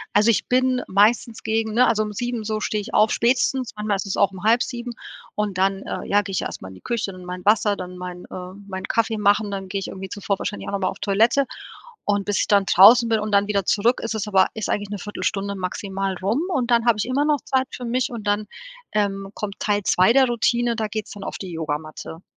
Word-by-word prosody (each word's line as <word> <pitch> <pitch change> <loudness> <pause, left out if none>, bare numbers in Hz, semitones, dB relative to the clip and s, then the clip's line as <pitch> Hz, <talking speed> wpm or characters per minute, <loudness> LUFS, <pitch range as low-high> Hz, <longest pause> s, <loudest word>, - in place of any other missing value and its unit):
Also, 210 +2 +5
ich 230 - +2
bin 255 0 +2
meistens 220 +3 +2
gegen, 220 0 -1
ne 250 +3 +5
also 215 -1 +2
um 210 - -5
7:00 240 +1 -3
so 215 0 -2
stehe 215 0 -1
ich 220 - -9
auf, 215 +1 +4
spätestens, 250 +1 +1
manchmal 210 -1 0
ist 195 - -3
es 195 - -3
auch 195 -1 +3
um 190 0 -10
6:30 240 +2 +1 0.4
und 210 -3 -2
dann, 195 +1 +1
äh - - -5
ja, 205 +1 +3
gehe 195 -1 -7
ich - - 0
erst - - -5
mal 95 - -8
in 95 - -10
die 95 - -15
Küche, 220 -4 -2
dann 185 0 -11
mein 180 0 -7
Wasser, 210 -1 +3
dann 180 0 -7
mein 180 0 -7
äh, 180 0 -8
meinen 190 -1 -5
Kaffee 225 -1 +1
machen, 205 0 +2
dann 195 -1 -5
gehe 200 +1 -2
ich 195 - -5
irgendwie 190 0 -7
zuvor 200 0 -2
wahrscheinlich 205 - -5
auch - - -4
noch 200 - 0
mal 185 - 0
auf - - -8
Toilette 225 +7 +3 0.6
und 205 -1 0
bis 205 -2 0
ich - - +1
dann 200 -1 +4
draußen 220 +7 +7
bin 225 -1 +2
und 210 0 -3
dann 200 0 +3
wieder 200 -2 0
zurück, 225 +6 +2
ist 230 -1 -2
es 215 -1 -3
aber 190 -2 +4
ist 220 -3 -4
eigentlich 205 -1 -1
ne 205 - -4
Viertelstunde 200 0 -3
maximal 195 +1 -3
rum 215 +9 +1
und 250 -4 0
dann 235 -1 +3
habe 230 - +4
ich 210 - -1
immer 255 +3 +1
noch 300 -1 +2
Zeit 265 0 +1
für 250 - -6
mich 245 +1 -1
und 220 -3 -6
dann, 205 +1 0 0.5
ähm, 195 -2 -1
kommt 205 -2 -6
Teil 205 -1 +1
2 185 +5 +4
der 265 +1 +5
Routine, 240 0 +1
da 220 -1 -1
geht's 215 0 -5
dann 200 - -8
auf - - -5
die 190 -2 -7
Yogamatte. 160 +1 -5
210 Hz, 250 wpm, -22 LUFS, 195-230 Hz, 0.6 s, draußen